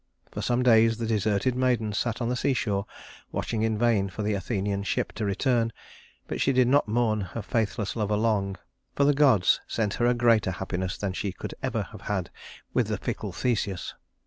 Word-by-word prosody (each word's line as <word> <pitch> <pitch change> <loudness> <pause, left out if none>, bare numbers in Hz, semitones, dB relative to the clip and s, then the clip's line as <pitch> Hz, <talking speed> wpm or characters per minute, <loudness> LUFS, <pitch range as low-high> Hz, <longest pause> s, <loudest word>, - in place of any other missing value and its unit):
For - - -5
some 125 +1 +1
days 115 -2 +5
the 115 - -2
deserted 110 +2 +1
maiden 120 -4 +1
sat 115 +3 -1
on 120 - 0
the 125 - 0
seashore 110 -7 0 0.4
watching 110 -2 -2
in 110 -1 +1
vain 110 -4 +2
for 95 +4 -5
the 105 +1 0
Athenian 100 0 -2
ship 100 - -1
to 110 - -3
return; 115 +3 +1 0.6
but - - -3
she 135 - +3
did 130 -2 +4
not 140 +1 +3
mourn 110 -1 +1
her 100 +4 -5
faithless 110 -2 -1
lover 105 -2 0
long, 100 -3 0 0.4
for 140 - +2
the 145 +1 +5
gods 135 -10 +4
sent 105 -3 -1
her 120 - +4
a 120 - +3
greater 115 -5 +3
happiness 95 0 -3
than 100 -2 -2
she 100 +1 -2
could - - -7
ever - - -1
have - - -11
had - - -3 0.4
with - - +2
the - - -1
fickle - - -4
Theseus. 100 -7 -2
110 Hz, 195 wpm, -27 LUFS, 100-120 Hz, 0.6 s, days